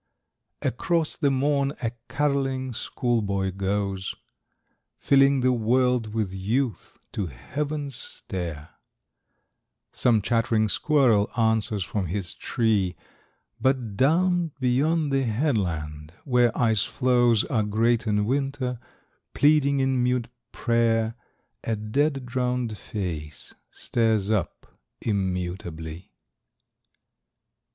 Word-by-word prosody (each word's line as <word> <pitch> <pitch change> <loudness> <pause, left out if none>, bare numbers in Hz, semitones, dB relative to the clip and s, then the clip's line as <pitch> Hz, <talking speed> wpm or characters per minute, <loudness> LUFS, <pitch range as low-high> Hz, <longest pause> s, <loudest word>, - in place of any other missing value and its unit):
Across 165 +6 0
the 145 -4 +2
morn 140 +1 +1
a 115 - 0 0.2
carolling 135 -3 0
school 120 0 -1
boy 100 -2 -1
goes, 95 0 -2 0.8
Filling 135 -1 +4
the 130 0 +3
world 125 0 +1
with 105 -4 -1
youth 110 +4 -2
to 100 -4 -2
heaven's 145 - -4
stair; 85 -4 -5 1.2
Some 115 -5 +2
chattering 115 -1 +1
squirrel 115 -3 +3
answers 110 -3 +1
from 95 +1 -3
his 90 +1 -3
tree; 105 -6 0 0.6
But 130 -6 0
down 170 - +2
beyond 145 +5 +1
the 135 0 +2
headland, 90 - -1
where 125 -3 +3
ice 110 -4 +3
floes 120 -3 +2
Are 120 -6 0
great 110 +3 +1
in 105 -1 +2
winter, 135 -1 -1 0.6
pleading 140 -1 +4
in 130 -1 +1
mute 125 -1 0 0.2
prayer, 115 -2 +1 0.5
A 115 - -1
dead, 135 +6 0
drowned 125 -2 -1
face 80 - -6 0.2
stares 110 -3 0
up 100 -6 -1 0.3
immutably. 90 -4 -3
115 Hz, 100 wpm, -25 LUFS, 100-135 Hz, 1.2 s, Filling